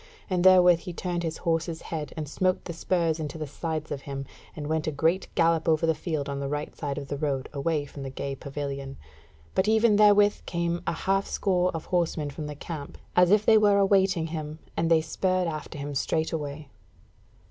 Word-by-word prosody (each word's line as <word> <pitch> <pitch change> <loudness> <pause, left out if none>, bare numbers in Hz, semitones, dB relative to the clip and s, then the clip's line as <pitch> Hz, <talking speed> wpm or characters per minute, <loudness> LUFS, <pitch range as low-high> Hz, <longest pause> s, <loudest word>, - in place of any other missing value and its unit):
And 180 -1 +1
therewith 180 -2 +7
he 180 0 -7
turned 175 0 -3
his 160 -2 -3
horse's 165 0 -1
head, 155 -2 -3
and 155 -1 -3
smote 185 +5 0
the 170 - -5
spurs 165 -1 0
into 155 0 -4
the 155 - -4
sides 155 +1 -4
of 140 - -3
him, 140 -1 -5 0.3
and 150 - -5
went 160 +1 -1
a - - +1
great 165 +6 +1
gallop 165 0 +3
over 160 +1 +3
the 160 - +3
field 155 -3 -3
on 140 -1 -3
the 140 - -3
right 150 +1 -4
side 140 -3 -4
of 140 -2 -5
the 145 - -3
road, 140 -3 -1
away 145 +1 -1
from 140 0 -10
the 135 - -4
gay 140 +1 -4
pavilion; 140 0 -5 0.6
but 190 - +1
even 220 -1 +4
therewith 205 -1 +5
came 170 0 -1
a - - +1
half 195 +4 0
score 180 -2 +1
of 165 - -5
horsemen 165 -4 0
from 150 +2 -6
the 150 - -6
camp, 150 -1 -7 0.2
as 180 -1 +6
if 210 +1 +4
they 220 -1 +7
were 205 -1 +4
awaiting 195 -3 +3
him, 155 -1 -5 0.2
and 165 - 0
they 165 -1 +5
spurred 185 +3 0
after 155 -1 -5
him 145 0 -5
straightway. 150 0 -2
160 Hz, 205 wpm, -27 LUFS, 145-180 Hz, 0.6 s, therewith